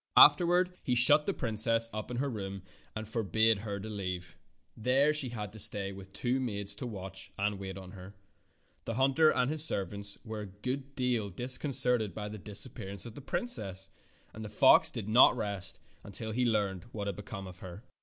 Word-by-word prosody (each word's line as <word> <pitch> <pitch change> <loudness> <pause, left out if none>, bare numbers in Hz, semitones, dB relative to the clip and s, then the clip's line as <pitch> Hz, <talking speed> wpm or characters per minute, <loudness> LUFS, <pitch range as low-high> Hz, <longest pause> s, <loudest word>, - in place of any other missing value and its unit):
Afterward 175 +4 +6
he 125 - -1
shut 150 +5 +7
the - - +2
princess 115 -2 0
up 110 +2 -5
in 120 - -5
her 140 +3 -1
room 100 -6 -6 0.3
and 110 -1 -5
forbade 110 0 +1
her 100 -1 -5
to 105 - -7
leave 90 -5 -5 0.4
it. - - -15
There 135 +5 +4
she 150 -4 +1
had 105 -4 -6
to 110 - -5
stay 100 -2 +5
with 95 0 -11
two 125 +6 -1
maids 100 -5 -3
to 125 - -5
watch 95 -3 -9
and 100 0 -1
wait 95 -1 -7
on 95 -1 -10
her. 95 +1 -12 0.7
The 115 - -4
hunter 135 +5 +4
and 130 -1 +1
his 155 -1 +5
servants 100 - -1
were 110 -1 -6
a 105 - -7
good 130 +8 -6
deal 125 -5 -1
disconcerted 125 - 0
by 105 -1 -5
the 105 0 -8
disappearance 100 -1 -8
of 115 - -9
the 145 - -10
princess, 100 - -5 0.4
and 110 - -8
the 105 - -7
fox 105 - +5
did - - -6
not 120 +3 +6
rest 100 -4 -5 0.4
till 110 +2 -5
he 125 +3 0
learned 100 -5 -1
what 110 -3 -7
had 100 -2 -3
become 100 0 -8
of 90 -1 -11
her. 95 +4 -10
110 Hz, 195 wpm, -31 LUFS, 100-125 Hz, 0.7 s, shut